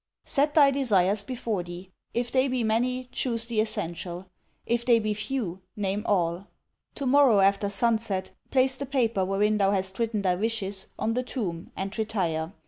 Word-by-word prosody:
'Set 295 0 +1
thy 285 -3 +7
desires 210 -7 +2
before 225 -3 -3
thee. 175 +2 -9 0.2
If 240 0 -2
they 260 +1 +3
be 255 -2 0
many, 245 +4 +1
chose 230 -4 -1
the 230 -2 -1
essential: 180 -3 -4 0.3
if 235 0 0
they 235 -1 +5
be 215 -1 0
few, 215 -4 -3
name 200 0 -1
all. 180 -1 0 0.5
To 280 - -4
morrow, 260 -5 +5
after 200 +1 +3
sunset, 215 -2 0 0.2
place 260 0 +3
the 280 - -5
paper 235 -7 +1
wherein 205 +3 +1
thou 195 -1 +4
hast 190 0 -1
written 225 -3 0
thy 185 -2 +3
wishes 200 -1 -2
on 225 - 0
the 250 - 0
tomb, 195 -10 -4
and 195 +2 -3
retire. 175 -7 -1
215 Hz, 170 wpm, -27 LUFS, 190-240 Hz, 0.5 s, thy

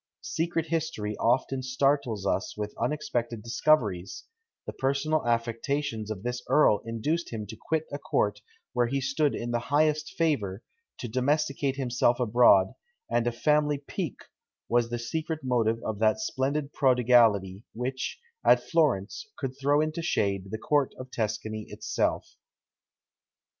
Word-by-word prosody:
Secret 165 0 -1
history 155 -10 -2
often 130 +3 +1
startles 130 -5 0
us 95 +1 -1
with 105 0 -4
unexpected 120 -4 -2
discoveries: 115 -7 +1 0.4
the - - -5
personal 140 +3 0
affectations 115 0 -1
of 105 -2 -5
this 125 0 -3
earl 110 -9 +5
induced 150 +10 -2
him 110 -2 -4
to 105 - -9
quit 160 +6 -2
a 145 - -4
court 105 -6 0 0.3
where 120 -1 +2
he 135 +3 -1
stood 140 +2 +1
in 120 0 -4
the 120 - +1
highest 150 +1 +1
favour, 115 - 0 0.3
to 125 - -5
domesticate 140 +2 0
himself 125 -2 +1
abroad; 115 -5 +5 0.4
and 120 0 +2
a - - +2
family 150 +4 +2
pique 145 +2 -5 0.4
was 120 -1 +2
the 120 - -2
secret 155 +6 -3
motive 115 -3 +1
of 110 -2 -3
that 110 - +3
splendid 140 -6 -2
prodigality 115 -7 +3
which, 130 +3 -3 0.3
at - - +6
Florence, 150 - 0
could 130 - -3
throw 145 +2 +3
into 155 +2 -2
shade 100 - 0
the 110 - -3
court 145 +3 +1
of 130 0 -9
Tuscany 110 -1 -3
itself. - - -2
125 Hz, 140 wpm, -28 LUFS, 110-145 Hz, 0.4 s, at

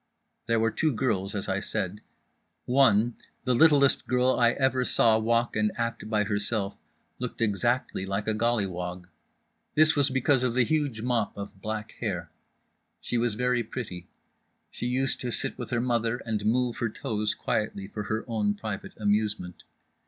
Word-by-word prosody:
There 115 -1 +2
were 115 0 +2
two 155 0 0
girls, 105 -5 -1
as 100 - -3
I 95 0 0
said. 105 -1 -3 0.6
One, 120 -3 +3 0.3
the 125 - +1
littlest 140 0 +5
girl 125 0 +3
I 120 -1 +5
ever 130 -1 +1
saw 115 -3 +4
walk 115 +1 +1
and 105 0 +2
act 115 -2 -3
by 105 -1 +2
herself, 100 0 -1 0.4
looked 125 -1 -5
exactly 115 0 0
like 100 +2 -2
a 110 - +2
gollywog. 90 -6 -1 0.7
This 155 +1 +6
was 145 -1 +5
because 130 0 +2
of 125 -2 0
the 130 - +4
huge 140 -5 -1
mop 120 -5 0
of 100 -1 -8
black 110 +1 -4
hair. 85 -8 -3 0.7
She 120 - -2
was 115 -2 0
very 125 +1 +1
pretty. 105 -7 -6 0.6
She 120 - -4
used 130 +2 0
to 125 - -2
sit - - -1
with 120 - -5
her 120 - 0
mother 120 -1 0
and 105 -2 -1
move 125 +1 +1
her 120 - -1
toes 105 0 -2
quietly 100 -2 -2
for 105 0 -6
her 110 +3 -2
own 105 -3 0
private 105 -1 -6
amusement. 105 -3 -1
115 Hz, 165 wpm, -27 LUFS, 105-125 Hz, 0.7 s, This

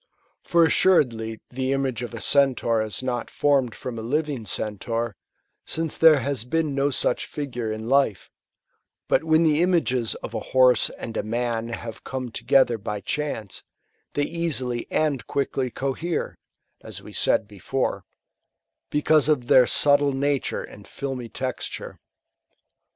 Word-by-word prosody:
For 170 -1 +4
assuredly 115 -11 +2
the 130 +1 -1
image 135 -3 -1
of 120 -1 -6
a 115 - -7
Centaur 130 -5 +3
is 110 +3 -5
not 125 -2 -2
formed 135 -5 +1
from 120 -3 -6
a - - -4
living 140 -1 -2
Centaur, 115 +1 -2 0.5
since 160 -1 -2
there 155 -4 +6
has 140 -5 -2
been 155 +3 -1
no 140 +1 +1
such 130 -2 0
figure 125 -6 -4
in 110 +1 -5
life; 135 -7 +1 0.8
but - - +2
when 160 0 +3
the 155 0 +3
images 160 -10 +1
of - - -6
a - - -2
horse 130 -1 +4
and 115 - -8
a - - +1
man 115 +1 -2
haT« 115 -1 -7
come 130 -2 -5
together 120 -1 +2
by 105 0 -4
chance, 125 -9 -4 0.5
they 145 - +1
easily 145 -7 -2
and 140 -7 0
quickly 135 -2 -1
cohere, 140 +7 -3 0.4
(as - - -8
we - - -11
said 110 - +2
before,) 105 +6 -3 0.9
because 150 0 +3
of 145 -5 +2
their 125 0 +6
subtle 145 -1 +4
nature 140 0 -1
and - - -13
filmy 130 -4 -5
texture. 130 +3 -5
130 Hz, 145 wpm, -24 LUFS, 115-145 Hz, 0.9 s, there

